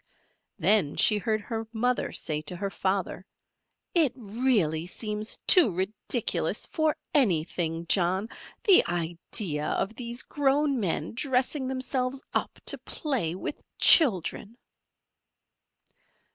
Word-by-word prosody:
Then 200 -9 +3
she 210 -1 +3
heard 215 0 -1
her 225 +1 -5
mother 245 +2 -1
say 150 -1 -2
to 180 - -6
her 195 +2 -4
father: 190 -1 -2 0.7
"It 320 -7 +3
really 210 - 0
seems 210 +2 -3
too 345 - +6
ridiculous 190 +4 -1
for 315 -2 0 0.2
any 195 - +3
thing, 165 0 -3
John, 185 +3 +1 0.4
the 390 -4 +7
idea 170 -1 -2
of 205 - -1
these 240 +1 -3
grown 285 -1 +1
men 165 -5 -2
dressing 260 +2 -1
themselves 260 0 -2
up - - -2
to - - -2
play 240 - -3
with 190 - -6 0.2
children." 225 - +4
215 Hz, 115 wpm, -27 LUFS, 180-260 Hz, 0.7 s, the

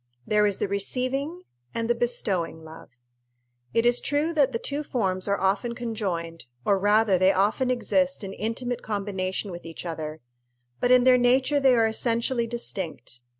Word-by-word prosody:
There 210 0 +3
is 200 - 0
the - - -1
receiving 255 - -1 0.3
and 230 0 -1
the 240 - +3
bestowing 195 -9 -1
love. 160 +1 -12 0.8
It 230 - +1
is 240 0 +4
true 295 +3 0
that 285 -4 +3
the 230 - -1
two 285 +5 -3
forms 190 -9 -1
are 200 0 +1
often 200 +5 0
conjoined, 185 -9 -4 0.2
or 200 -1 +3
rather 205 -1 +3
they 185 +1 +5
often 205 +7 +1
exist 270 +1 0
in 195 0 -5
intimate 235 +4 -3
combination 195 -2 -3
with 175 0 -8
each 165 +2 -8
other; 155 -2 -5 0.6
but 245 - +1
in 250 0 +6
their 255 0 +6
nature 260 +4 +3
they 265 -2 +5
are 230 -1 +4
essentially 235 +2 0
distinct. 190 - -5
225 Hz, 165 wpm, -26 LUFS, 190-250 Hz, 0.8 s, in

